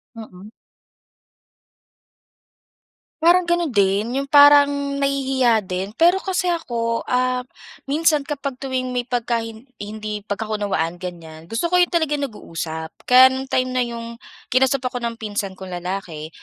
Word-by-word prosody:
Mm. 210 -2 -11 2.7
Parang 350 +1 +4
gano'n 345 -5 0
din. 200 +3 +1
Yung 275 - -8
parang 285 0 +7 0.3
nahihiya 265 -6 +1
din, 185 +2 -3
pero 350 +3 +4
kasi 365 -2 0
ako, 230 -7 -2
ah, 255 0 +1 0.5
minsan 305 0 +2
kapag 280 -2 -5
tuwing 255 -1 -3
may 245 0 -3
pagka 235 -1 0
hin 225 +2 -9 0.2
hindi 210 0 -5
pagkakaunawaan 205 -5 -3
ganyan, 165 -3 -9
gusto 225 +8 -2
ko 360 +1 +3
yung 355 - +3
talaga 320 -4 0
nag-uusap. 165 - -5 0.2
Kaya 260 +1 +8
nung 265 0 -5
time 255 0 0
na 255 - +1
yung 235 -1 -6 0.3
kinausap 265 0 +2
ako 250 -1 -3
ng 235 -1 -3
pinsan 205 -3 -4
kong 185 -1 -8
lalaki, 175 -3 -5
240 Hz, 135 wpm, -21 LUFS, 205-275 Hz, 2.7 s, Kaya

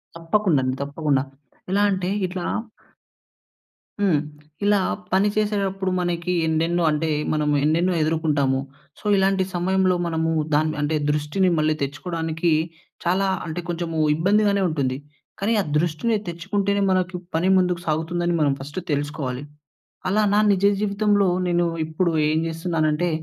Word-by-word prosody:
తప్పకుండండి 165 -7 +1
తప్పకుండా. 140 -1 0 0.5
ఎలా 200 +1 +3
అంటే 185 -1 -1 0.2
ఇట్లా 180 -1 -5 1.6
హ్మ్. 185 -7 +3 0.5
ఇలా 205 -1 +4 0.3
పని 195 +2 +4
చేసేడప్పుడు 195 -3 0
మనకి 175 0 -1
ఎన్నెన్నో 165 +2 +1
అంటే, 155 +1 0 0.2
మనము 150 -1 +1
ఎన్నెన్నో 170 +4 +2
ఎదుర్కుంటాము. 150 -4 +1 0.4
సో, - - -20
ఇలాంటి 195 0 +2
సమయంలో 185 +1 +2
మనము 160 -1 0 0.2
దాన్ని 155 +1 +2
అంటే, 150 +2 0 0.2
దృష్టిని 150 +6 +1
మళ్ళీ 155 0 +2
తెచ్చుకోవడానికి 160 +3 -2 0.5
చాలా 185 +3 +2 0.2
అంటే, 170 +2 -4
కొంచెము 165 -1 -2 0.2
ఇబ్బందిగానే 200 +4 +2
ఉంటుంది. 135 -4 -1 0.4
కానీ 220 +3 +1
ఆ - - -2
దృష్టిని 175 +8 0
తెచ్చుకుంటేనే, 200 +4 -1
మనకి 185 0 0 0.2
పని 175 +3 +2
ముందుకు 180 -2 +1
సాగుతుందని 170 +2 0
మనం 140 -2 +3
ఫస్టు 145 +7 -6
తెలుసుకోవాలి. 145 -2 -3 0.7
అలా 210 +3 +2
నా - - +5
నిజ 195 0 +2 0.2
జీవితంలో, 205 -1 +2 0.2
నేను 175 0 +2 0.2
ఇప్పుడు 165 +2 0 0.2
ఏం 155 - +1
జేస్తున్నానంటే, 165 0 0
170 Hz, 125 wpm, -23 LUFS, 155-190 Hz, 1.6 s, నా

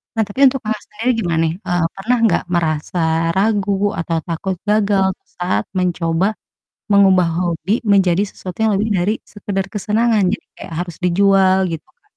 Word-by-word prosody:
Nah, 225 - +2
tapi 205 +5 -8
untuk 270 0 +3
Kakak 215 -1 -3
sendiri 225 +4 0
gimana 170 -2 0
nih, 160 - -2
eee, 175 -2 0
pernah 225 +6 0
nggak 175 - +1
merasa 165 0 -1 0.3
ragu 200 +1 +1 0.2
atau 165 0 -2
takut 180 +3 -3
gagal 205 -2 +2
tuh - - -52
saat 175 - 0
mencoba, 180 -1 0 0.6
mengubah 190 -4 +5
hobi 175 +4 -1
menjadi 195 -2 +3
sesuatu 185 -2 -9
yang 220 - +2
lebih 215 +3 -1
dari 195 +2 +1 0.2
sekedar 200 -2 -3
kesenangan 215 +1 +1
jadi - - -13
kayak - - -9
harus 175 -2 -9
dijual 190 +1 +3
gitu, 165 -2 -6
Kak? - - -34
190 Hz, 165 wpm, -18 LUFS, 175-205 Hz, 0.6 s, mengubah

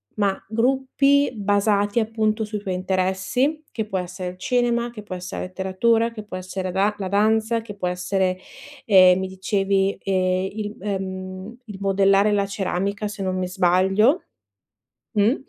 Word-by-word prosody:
ma 200 -2 +1
gruppi 265 +4 +2
basati 205 +1 +1
appunto 220 0 0
sui 210 0 -4
tuoi 190 -2 -4
interessi, 190 +11 0
che 220 -2 -3
può 195 -3 -2
essere 180 0 -5
il 180 - -15
cinema, 240 +2 +1
che 225 -3 -10
può 200 - -7
essere 180 +1 -5
la - - -4
letteratura, 210 +5 +1
che 215 -2 -8
può 205 - -8
essere 185 0 -4
da 200 +3 +1
la 195 - -4
danza, 220 +3 +2
che 215 -2 -9
può 185 -3 -3
essere, 185 +1 -1 0.5
ehm, 185 -3 +6
mi 190 - -2
dicevi, 195 +1 0
ehm, 185 0 0
il, 210 0 -5
ehm, 190 +1 -5
il 210 -4 -9
modellare 195 +1 +3
la 200 -1 +1
ceramica, 200 +1 -2
se 205 -1 -7
non 185 -1 -1
mi 185 -1 -1
sbaglio, 190 - +3 0.9
mh. 215 +6 +4
200 Hz, 160 wpm, -23 LUFS, 185-220 Hz, 0.9 s, ehm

